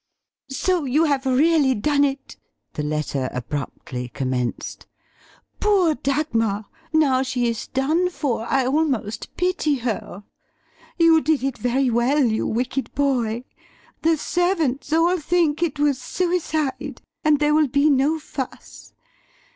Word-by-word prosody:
"So 340 +4 0
you 280 +5 +2
have 280 -4 +1
really 280 0 +3
done 285 +6 +2
it!" 275 -1 -2 0.4
the - - -3
letter 150 -3 -2
abruptly 125 -1 -5
commenced; 130 -2 -3 0.7
"Poor 390 -6 +3
Dagmar. 230 -9 -1 0.3
Now 285 -5 +3
she 255 -2 0
is 230 -2 -3
done 310 +7 +1
for 255 -10 -2
I 270 -2 +2
almost 265 -6 -1
pity 360 -5 +1
her. 225 -5 -4 0.7
You 330 -2 +5
did 305 -2 +1
it 270 -2 -1
very 250 +1 +1
well, 250 +5 +2
you 220 -2 0
wicked 250 +3 -2
boy, 245 -5 0 0.6
the 325 0 +3
servants 325 -6 0
all 340 +3 +3
think 320 -1 +1
it 315 -4 0
was 285 -3 +1
suicide, 320 -5 -2 0.2
and 305 -1 +4
there 300 0 +2
will 305 -1 +4
be 280 +3 +2
no 290 +2 +3
fuss. 280 -4 -8
275 Hz, 130 wpm, -22 LUFS, 240-315 Hz, 0.7 s, You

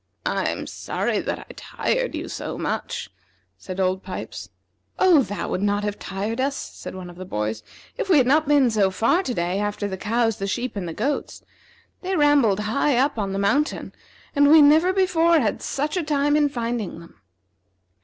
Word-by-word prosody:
"I'm - - -1
sorry - - -2
that - - -3
I - - -11
tired - - -2
you - - -5
so - - -5
much," - - -4 0.5
said 185 0 -7
Old 185 0 +1
Pipes. 185 -1 -7 0.5
"Oh, 350 -6 +5
that 205 -5 -4
would 185 - -1
not 205 0 +1
have 205 -1 -3
tired 205 +5 -4
us," 275 +1 0
said - - -8
one 185 -1 -7
of 175 -1 -12
the 185 - -6
boys, 110 -9 -3 0.4
"if - - -3
we 350 - +6
had 260 - +5
not 300 +4 +3
been 285 -4 +4
so 205 -3 +3
far 225 - +2
to 260 -10 -3
day 175 +3 -1
after 205 0 -2
the 190 -1 -5
cows, 225 +2 0
the 195 - -3
sheep, 240 +5 -3
and 190 -3 -4
the 165 - -5
goats. 290 +1 -3 0.6
They 380 0 -2
rambled 285 - +3
high 240 +5 +1
up 270 -1 +1
on 200 -2 -2
the 195 - -2
mountain, 245 +10 0 0.4
and 285 0 +5
we 315 +1 +8
never 310 +5 +6
before 340 -3 +3
had 220 -7 -1
such 295 +4 -2
a 360 - +1
time 290 -1 +1
in 295 -1 +3
finding 235 - -3
them." 170 -11 -16
235 Hz, 195 wpm, -23 LUFS, 195-295 Hz, 0.6 s, we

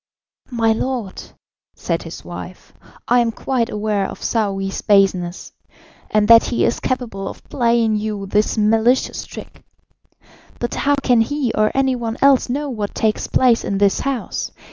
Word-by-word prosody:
"My 230 -3 +1
lord," 235 -4 -3 0.5
said - - -2
his - - -9
wife, - - -9 0.3
"I 245 +1 +4
am 235 -1 +1
quite 240 0 -2
aware 210 -2 -1
of - - -9
Saouy's 195 -4 -1
baseness, 190 -4 +1 0.6
and 210 -1 +2
that 230 0 +8
he 240 - 0
is - - 0
capable 230 -7 -3
of - - -9
playing 235 -3 +2
you 210 -1 -4
this 210 +3 0
malicious 225 +4 +2
trick. - - -11 1.0
But 240 - -3
how 285 0 +1
can 250 -4 +2
he 270 0 -1
or 215 0 +2
any 265 -1 +2
one 230 -2 -4
else 275 -3 +4
know 290 +4 -2
what 215 -6 -4
takes 215 -1 0
place 245 -3 +3
in 200 - -2
this 200 0 +2
house? 270 -4 -3
225 Hz, 155 wpm, -19 LUFS, 210-250 Hz, 1.0 s, that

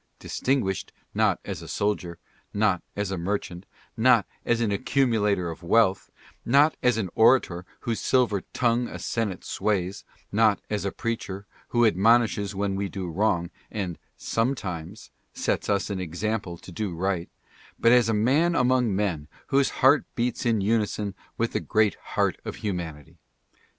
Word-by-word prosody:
Distinguished, 125 -9 -1 0.2
not - - +2
as - - -5
a - - -9
soldier; 95 -5 -2 0.4
not 100 -4 +2
as 100 -1 -2
a 95 - -2
merchant; 90 0 -3 0.3
not 115 -3 +4 0.2
as 120 -1 +2
an 115 -3 +1
accumulator 105 - +1
of 80 - -10
wealth; 95 +2 +2 0.3
not 145 +5 +4
as 125 -3 +3
an 95 -6 -2
orator 110 -7 +3
whose 115 -2 -2
silver 120 -7 +2
tongue 120 0 +1
a - - -7
senate 110 -6 -2
sways; 95 -2 -1 0.3
not 110 -1 +3
as 105 -2 -1
a 100 - -1
preacher, 100 -4 -4 0.2
who 120 0 +3
admonishes 110 0 +3
when 100 0 -1
we 100 0 -2
do 95 -2 -5
wrong 85 -1 0 0.2
and 95 -6 -4 0.2
sometimes 105 -6 -3 0.2
sets - - -1
us 100 0 0
an 95 - -2
example 90 +1 -3
to 90 - -12
do 95 -1 -3
right; 90 0 -1 0.5
but 115 - +4
as 120 -2 +5
a - - +2
man 145 +11 +3
among 125 -5 +2
men 90 -7 -1 0.2
whose 140 0 +3 0.2
heart 140 +2 +5
beats 120 0 -1
in 110 -3 +2
unison 105 -1 0 0.2
with 115 0 0
the - - +1
great 105 -2 +2 0.2
heart - - +2
of - - -5
humanity. 85 -7 -5
105 Hz, 155 wpm, -26 LUFS, 95-115 Hz, 0.5 s, as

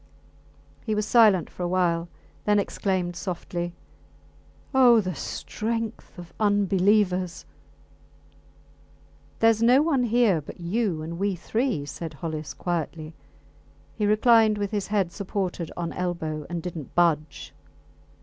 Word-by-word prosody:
He 215 -2 -1
was 210 0 0
silent 210 -8 +5
for - - -11
a 175 - 0
while, 175 -2 0 0.4
then 210 0 +3
exclaimed 185 -3 -1
softly 175 -1 -4 1.0
Oh! 250 -3 +6
the 185 -3 -2
strength 225 +8 -4
of 175 -1 -11
unbelievers! 195 -3 +2 2.0
Theres 225 -1 +4
no 250 +5 +5
one 280 -6 +1
here 225 -7 +3
but 145 - -11
you 175 -2 -1
and 170 +2 -6
we 200 -1 0
three, 220 - -1
said 160 +1 -7
Hollis, 155 0 -5
quietly. 165 -2 -3 0.8
He 210 - -1
reclined 215 0 +4
with 205 -1 -2
his 205 -2 -2
head 200 -4 0
supported 185 -3 -3
on 170 -1 -3
elbow 160 -4 -3
and 170 -2 -4
did 180 -1 -5
not 150 -5 -8
budge. 155 -4 +1
185 Hz, 125 wpm, -25 LUFS, 170-215 Hz, 2.0 s, Oh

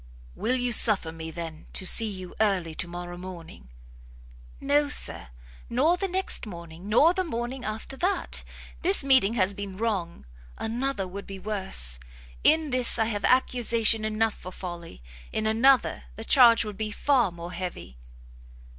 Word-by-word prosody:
"Will 250 - -1
you 245 -1 -1
suffer 205 -7 +5
me, 160 0 -8
then, 160 -1 -8
to 190 - -4
see 225 +4 +7
you 185 -3 -8
early 190 -6 0
to 170 - -1
morrow 175 0 -8
morning?" 170 - -11 0.9
"No, 285 +1 +1
Sir; 175 - 0 0.4
nor 285 +9 +2
the 390 +2 -3
next 380 -9 -2
morning, 170 0 -10
nor 295 +10 +5
the 375 - -1
morning 245 -4 -5
after 220 +4 -5
that! 375 +6 0 0.4
This 375 -2 +2
meeting 260 -6 +4
has 195 -3 +1
been 195 -1 -7
wrong, 195 - -3 0.3
another 235 -3 -3
would 200 +2 -9
be 195 - -7
worse; 190 - -1 0.4
in 315 -2 +3
this 250 -2 +1
I 225 - +1
have 205 -3 -3
accusation 235 -3 +3
enough 215 0 0
for 185 - -10
folly, 175 - -9 0.3
in 220 - -2
another 245 +4 +2
the 225 - -8
charge 235 -3 +6
would 210 -2 -7
be 215 0 -3
far 245 -2 +1
more 170 +1 -9
heavy." 175 - -7
215 Hz, 155 wpm, -26 LUFS, 180-250 Hz, 0.9 s, see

